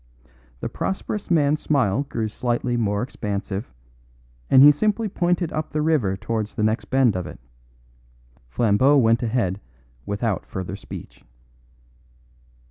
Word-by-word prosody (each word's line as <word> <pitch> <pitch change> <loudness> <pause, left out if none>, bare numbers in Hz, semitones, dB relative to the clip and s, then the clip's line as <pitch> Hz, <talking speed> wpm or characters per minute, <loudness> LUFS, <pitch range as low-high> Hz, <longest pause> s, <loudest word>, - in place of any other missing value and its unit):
The - - -2
prosperous 200 +2 -4
man's 150 -3 +3
smile 135 -2 +1
grew 110 -2 -2
slightly 120 +2 -2
more 105 -2 0
expansive, 100 -3 -4 0.8
and 130 - +7
he 145 - +10
simply 215 +8 0
pointed 175 -3 0
up 155 0 -3
the 150 - -2
river 130 -12 +1
towards 110 +1 -3
the 110 - -1
next 110 0 0
bend 130 -3 +2
of 90 -2 -3
it. - - -10 1.1
Flambeau 120 - +3
went 115 -3 +3
ahead 110 -5 -1 0.5
without 105 0 -2
further 95 0 -5
speech. 100 - -10
120 Hz, 125 wpm, -23 LUFS, 105-145 Hz, 1.1 s, he